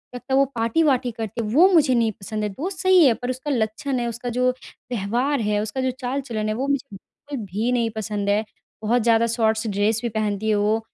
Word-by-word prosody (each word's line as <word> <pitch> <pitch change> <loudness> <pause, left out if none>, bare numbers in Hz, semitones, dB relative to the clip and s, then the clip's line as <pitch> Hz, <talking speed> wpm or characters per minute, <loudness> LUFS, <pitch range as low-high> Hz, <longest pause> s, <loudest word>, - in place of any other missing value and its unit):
लगता 255 +2 -5
है - - +5
वो 275 - +5
पार्टी-वार्टी 250 +2 +2
करती 225 0 -5
है 220 - -3
वो 335 +8 +7
मुझे 300 -6 +5
नहीं 230 -2 +2
पसंद 215 +2 -4
है 210 - -1
दोस्त 325 - -5
सही 375 -3 +5
हैं 245 -4 +5
पर 245 +2 -5
उसका 260 +4 -3
लक्षण 245 +2 -1
है 240 - -1
उसका 235 +1 -4
जो 250 0 +3 0.4
व्यवहार 245 +6 0
है 210 -1 0
उसका 220 +5 -3
जो 260 0 0
चाल-चलन 245 -4 -3
है - - 0
वो 265 +4 -2
मुझे 280 -1 -1
बिल्कुल 265 +4 -9
भी 210 +6 -1
नहीं 235 -2 +1
पसंद 210 -2 -2
है। 205 +2 +2 0.4
बहुत 240 +3 +2
ज़्यादा 230 0 +4
शॉर्ट्स 220 -1 +1
ड्रेस 205 +2 +1
भी 240 - -2
पहनती 215 -1 -1
है 215 - +3
वो, 210 +2 +2
235 Hz, 225 wpm, -23 LUFS, 215-260 Hz, 0.4 s, वो